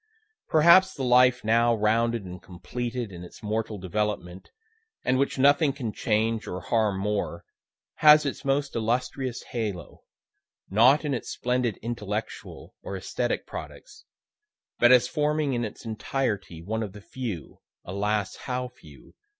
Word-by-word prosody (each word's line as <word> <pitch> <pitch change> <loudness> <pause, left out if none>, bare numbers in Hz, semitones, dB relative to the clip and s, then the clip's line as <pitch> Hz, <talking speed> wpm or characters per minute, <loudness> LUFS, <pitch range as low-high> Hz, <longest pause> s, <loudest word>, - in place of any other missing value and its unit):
Perhaps 170 +4 +6
the 135 - -4
life 125 0 +4
now 115 +2 +3
rounded 115 0 +1
and 90 0 -9
completed 115 +6 -5
in 90 -1 -9
its 90 - -13
mortal 110 0 -2
development, 95 -1 -3 0.6
and 130 +1 +2
which 140 - 0
nothing 140 +2 +4
can 120 -6 -5
change 110 -1 0
or 90 - -4
harm 110 -3 0
more, 100 -4 -2 0.5
has 150 0 +7
its 140 - -4
most 140 +1 0
illustrious 120 +2 -2
halo, 105 -8 -4 0.7
not 125 +9 +5
in 145 - 0
its 120 - -4
splendid 125 -3 -1
intellectual 110 -2 -5
or 95 - -5
esthetic 120 +6 -2
products, 435 +1 -10 0.8
but 120 - +6
as 125 -1 +6
forming 150 0 0
in 120 -1 -1
its 110 +1 -7
entirety 110 -6 -3
one 110 +5 -2
of 105 -4 -5
the 105 - -11
few 110 - -6 0.3
(alas! 100 +2 -1
how 125 -1 -2
few!) 80 - -17
115 Hz, 140 wpm, -26 LUFS, 105-130 Hz, 0.8 s, has